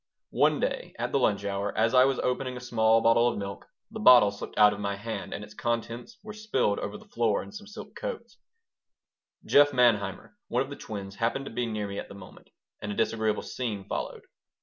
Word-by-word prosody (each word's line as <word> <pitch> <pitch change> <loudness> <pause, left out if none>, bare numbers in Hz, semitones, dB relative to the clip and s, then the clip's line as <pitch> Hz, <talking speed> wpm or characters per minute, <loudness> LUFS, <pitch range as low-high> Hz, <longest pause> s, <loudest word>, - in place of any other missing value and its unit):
One - - +3
day, - - -3
at - - -3
the 140 - +2
lunch 100 -5 +1
hour, 100 0 -2
as 115 +2 +2
I 130 0 +7
was 135 -1 +1
opening 125 0 -2
a - - -6
small 115 -2 +3
bottle 115 +1 +4
of 120 - -1
milk, 100 -1 -6 0.2
the 220 - -7
bottle 125 - +7
slipped 100 - -9
out 105 0 +7
of 100 - -8
my 100 -1 -2
hand 110 +3 -6
and 105 - -5
its 105 0 -12
contents 120 - -3
were 215 0 -8
spilled 170 - 0
over 100 - -5
the - - -16
floor 115 -3 0
and 200 - -13
some 210 0 -9
silk 210 - -10
coats - - -7 1.1
Jeff 145 0 +6
Manheimer, 115 - +1
one - - +1
of 135 - -11
the - - -5
twins, 100 -5 -7
happened 120 +4 -1
to - - -7
be 120 +1 -2
near 105 -2 -3
me 100 0 -5
at - - -7
the - - -10
moment, 95 -2 -14 0.3
and 105 - -4
a - - -4
disagreeable 110 -1 0
scene 110 -6 -4
followed. - - -4
115 Hz, 215 wpm, -28 LUFS, 105-130 Hz, 1.1 s, I